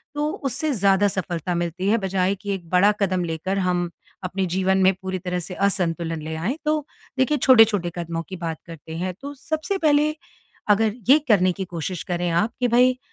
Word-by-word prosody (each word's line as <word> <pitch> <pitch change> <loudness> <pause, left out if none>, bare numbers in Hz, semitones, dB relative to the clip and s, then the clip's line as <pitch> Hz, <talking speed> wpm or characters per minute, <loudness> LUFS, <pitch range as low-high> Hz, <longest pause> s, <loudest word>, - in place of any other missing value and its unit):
तो 295 +1 0 0.2
उससे 275 +3 -1
ज़्यादा 200 -2 +3
सफलता 180 -3 -3
मिलती 175 +2 -2
है। 225 - +4
बजाए 190 -2 0
कि 200 0 -4
एक 180 -3 -6
बड़ा 185 +4 +5
कदम 185 -2 +1
लेकर 170 +4 -3
हम 180 -2 0 0.3
अपने 185 +1 -2
जीवन 190 +2 +1
में 190 +1 +5
पूरी 190 0 -3
तरह 180 0 -3
से 180 +2 -7
असंतुलन 170 -4 -1
ले 160 +1 -5
आएँ। 195 - -2
तो 305 0 +2 0.4
देखिए 265 +3 +2
छोटे-छोटे 225 -9 +5
कदमों 165 -1 -3
की 190 - -5
बात 165 -2 -4
करते 160 -1 -9
हैं। 180 +2 -2
तो 285 +1 -6
सबसे 315 +6 -3
पहले 305 -2 +2 0.5
अगर 210 +1 +3 0.2
ये 290 +3 +8
करने 185 -5 +4
की 190 +2 -5
कोशिश 175 0 -5
करें 175 0 -2
आप 175 +7 +1
कि 250 - +2
भई 250 +2 +4
190 Hz, 190 wpm, -23 LUFS, 175-225 Hz, 0.5 s, ये